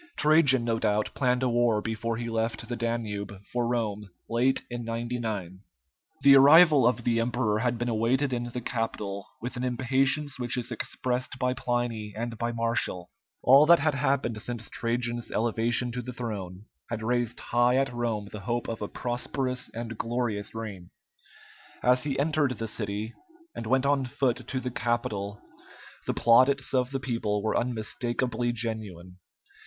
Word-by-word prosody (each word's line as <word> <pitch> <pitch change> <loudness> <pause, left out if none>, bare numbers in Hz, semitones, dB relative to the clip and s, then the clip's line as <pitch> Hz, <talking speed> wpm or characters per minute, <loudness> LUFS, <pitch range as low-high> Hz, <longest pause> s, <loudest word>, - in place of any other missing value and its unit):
Trajan, 150 -5 +5
no 115 -1 0
doubt, 105 0 +1
planned 125 -1 +1
a - - +3
war 120 -2 +2
before 115 +1 -3
he 120 0 -4
left 115 0 -2
the 120 - -3
Danube 115 -4 -3 0.2
for 120 -1 0
Rome 105 -4 -2 0.2
late 125 +3 +1
in 120 -1 -5
99. 115 -5 -4 0.6
The 140 0 +8
arrival 145 -1 +7
of 120 -1 0
the 115 -1 +1
emperor 115 -2 0
had 120 +1 0
been 120 +1 -2
awaited 125 +4 +1
in 120 -1 -2
the 120 +1 -5
capital 105 -5 -3
with 125 +2 -5
an 125 - -3
impatience 130 +3 +1
which 120 0 +1
is 125 - -2
expressed 130 +1 -2
by 125 -1 0
Pliny 120 -4 -2
and 115 +1 -3
by 120 0 -1
Martial. 115 -6 -2 0.3
All 140 +4 +7
that 170 +1 +8
had 155 0 +1
happened 135 -5 0
since 120 -1 -3
Trajan's 120 0 -1
elevation 115 +2 +1
to 125 +1 -3
the 125 +1 -7
throne 105 -5 -6 0.2
had 110 -1 -4
raised 120 0 0
high 120 +1 +2
at 135 -1 +1
Rome 115 -4 -2
the 105 - -7
hope 120 +4 -2
of 115 -1 -5
a 105 - -2
prosperous 125 +2 -2
and 115 -1 -7
glorious 115 -3 -2
reign. 100 -6 -7 0.9
As 125 +2 +3
he 140 -2 -1
entered 145 -2 +1
the 115 - -3
city 105 +1 -3 0.4
and 115 - -6
went 130 +3 +2
on 140 -1 +2
foot 125 0 0
to 130 - -2
the 125 -1 -4
Capitol, 105 -4 -2 0.7
the - - 0
plaudits 130 +4 +4
of 125 -1 +2
the 135 0 -3
people 110 -5 -2
were 110 - 0
unmistakably 120 +1 -1
genuine. 105 -6 -5
120 Hz, 165 wpm, -27 LUFS, 110-125 Hz, 0.9 s, The